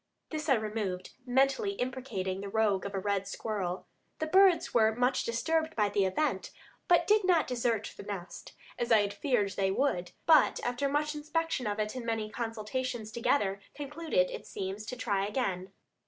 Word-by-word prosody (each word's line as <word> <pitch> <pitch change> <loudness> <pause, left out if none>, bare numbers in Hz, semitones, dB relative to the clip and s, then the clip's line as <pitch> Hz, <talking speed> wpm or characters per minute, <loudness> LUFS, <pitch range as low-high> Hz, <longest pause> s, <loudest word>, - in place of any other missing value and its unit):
This 310 -1 -3
I 270 - +6
removed, 210 -4 -3 0.2
mentally 275 - +2
imprecating 245 - -3
the 200 - -5
rogue 205 -2 +1
of 200 - -7
a - - 0
red 200 0 -1
squirrel. 190 -5 -3 0.3
The 315 - -1
birds 375 +2 +4
were 220 -2 +4
much 250 +2 +2
disturbed 315 +8 0
by 210 -2 +2
the 200 -1 +2
event, 190 +12 0 0.4
but 345 -2 +5
did 425 0 +4
not 355 -4 +4
desert 235 -4 -1
the - - -9
nest, 185 -4 -7 0.3
as 240 - -1
I 220 -2 +7
had 200 0 -2
feared 210 -4 +1
they 195 0 0
would, 185 -6 0
but 315 -3 +5
after 245 +3 0
much 300 +2 0
inspection 300 -3 -2
of 205 0 -1
it 215 0 -1
and 255 -2 -5
many 225 -2 -2
consultations 230 0 -3
together, 205 -4 +1
concluded, 330 - 0
it - - -7
seems, 195 +3 -5
to 255 - -4
try 200 -5 0
again. 195 -5 -2
230 Hz, 175 wpm, -31 LUFS, 200-290 Hz, 0.4 s, I